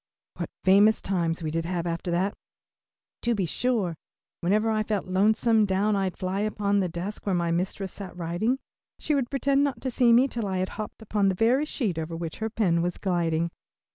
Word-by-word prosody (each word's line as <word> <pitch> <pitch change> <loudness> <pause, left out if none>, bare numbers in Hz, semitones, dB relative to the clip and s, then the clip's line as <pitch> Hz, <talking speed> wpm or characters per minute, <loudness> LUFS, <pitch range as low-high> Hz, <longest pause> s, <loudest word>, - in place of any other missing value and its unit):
What - - -4
famous 205 +3 +5
times 170 -3 -1
we 155 - -2
did 165 +1 -1
have 175 -1 -2
after 170 +1 -3
that, 185 +4 +1 0.9
to 235 0 +1
be 195 -3 0
sure. 205 -2 0 0.4
Whenever 215 +5 +2
I 215 0 +1
felt 210 -2 -1
lonesome 215 +4 +3
down 205 +1 +1
I'd 190 -2 -1
fly 185 +1 -2
upon 205 -1 +1
the 185 -2 0
desk 180 +6 -5
where 195 - +2
my 170 -1 0
mistress 185 +2 -2
sat 185 -3 -8
writing. 175 +9 0 0.4
She 305 - -1
would 270 -4 0
pretend 275 +1 +2
not 280 -2 -1
to 260 - -2
see 240 -1 +4
me 245 +3 +6
till 230 -5 -3
I 190 -1 -1
had 185 0 -1
hopped 215 0 -7
upon 205 -2 +1
the 190 - 0
very 245 +9 +3
sheet 215 - -2
over 160 +1 -4
which 165 -1 -5
her 220 0 -1
pen 185 -7 +1
was 175 +1 -1
gliding. 170 -3 0
195 Hz, 200 wpm, -26 LUFS, 175-220 Hz, 0.9 s, me